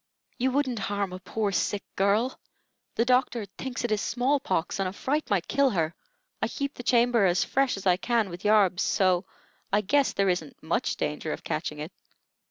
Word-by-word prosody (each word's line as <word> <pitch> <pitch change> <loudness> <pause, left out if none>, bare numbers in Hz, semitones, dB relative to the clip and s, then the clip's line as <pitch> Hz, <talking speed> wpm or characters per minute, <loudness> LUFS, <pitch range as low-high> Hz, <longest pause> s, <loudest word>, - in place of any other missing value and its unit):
You 255 +2 +2
wouldn't 260 -3 0
harm 200 -2 -2
a 185 - -6
poor, 205 +2 -2
sick 200 +1 -1
girl. 205 +6 +1 0.6
The 230 - +2
doctor 250 -3 +2
thinks 260 -2 -4
it 240 - -1
is 215 -1 +1
small 255 +4 +1
pox, 185 -7 -1
and 190 -1 0
a - - -9
fright 295 +8 -2
might 195 -4 +1
kill 280 -1 +3
her. 165 -6 0 0.5
I - - +2
keep 280 0 -3
the - - -8
chamber 240 -3 +3
as 175 0 +2
fresh 270 -4 +1
as 195 - -8
I 180 -1 +4
can 225 -2 0
with 175 +2 -8
yarbs, 205 -4 +4
so 185 -2 +2 0.5
I 205 +1 +3
guess 275 +7 +2
there 195 -1 +2
isn't 170 -5 -3
much - - 0
danger - - -3
of - - -5
catching - - -3
it." - - -6
210 Hz, 195 wpm, -27 LUFS, 190-250 Hz, 0.6 s, I